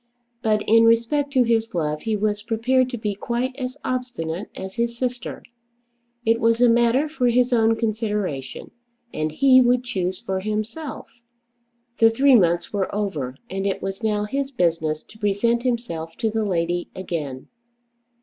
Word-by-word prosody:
But 215 -2 +1
in 225 +1 +5
respect 235 +6 +2
to 255 -2 +5
his 225 -2 0
love 150 -2 -1
he 220 -1 -1
was 210 0 -1
prepared 245 +4 +1
to 245 - -4
be 210 -2 -2
quite 240 +5 -2
as 255 0 -5
obstinate 235 -9 -3
as 190 0 -7
his 235 +1 -2
sister. 245 -2 -4 0.8
It 225 +1 +3
was 230 0 +2
a 245 - +6
matter 235 +5 +3
for 290 -5 0
his 245 +1 +3
own 225 -1 +4
consideration, 210 - -3 0.4
and 155 0 -2
he 260 - +5
would 245 0 +3
choose 185 -6 -2
for 190 -5 -3
himself. 215 +9 -4 0.9
The 225 - +7
three 270 +4 +4
months 175 -6 +3
were 195 -2 0
over, 155 -12 -2
and 195 -1 -3
it 195 - -2
was 195 +1 -4
now 210 -2 0
his 270 +6 -2
business 165 - 0
to 220 - -18
present 220 +3 +1
himself 230 -10 -3
to 220 - 0
the 220 0 -1
lady 175 -2 -1
again. 150 -8 -5
225 Hz, 160 wpm, -23 LUFS, 190-245 Hz, 0.9 s, The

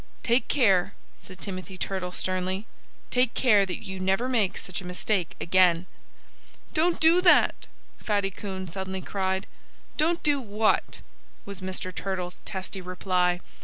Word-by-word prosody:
"Take 240 +1 +2
care 195 -10 +3
" - - -32
said 185 -1 -11
Timothy 185 -1 -6
Turtle 185 -1 -3
sternly 185 +2 -2 0.5
"take 250 -1 +2
care 210 -6 +4
that 180 - -5
you 190 -1 -6
never 195 +6 +1
make 220 -7 +1
such 185 0 -4
a - - -10
mistake 180 0 -1
again." 180 -1 +3 0.9
"Don't 335 +2 +2
do 330 +3 +6
that!" 360 -1 +4 0.3
Fatty 200 -2 0
Coon 190 -1 -6
suddenly 190 +2 -4
cried. 190 0 -1 0.5
"Don't 335 +3 +1
do 290 -2 +2
what?" 215 -1 0 0.4
was 200 -1 -7
Mr. 185 0 -3
Turtle's 180 -1 -4
testy 190 0 -5
reply. 180 -1 0
190 Hz, 140 wpm, -27 LUFS, 185-215 Hz, 0.9 s, do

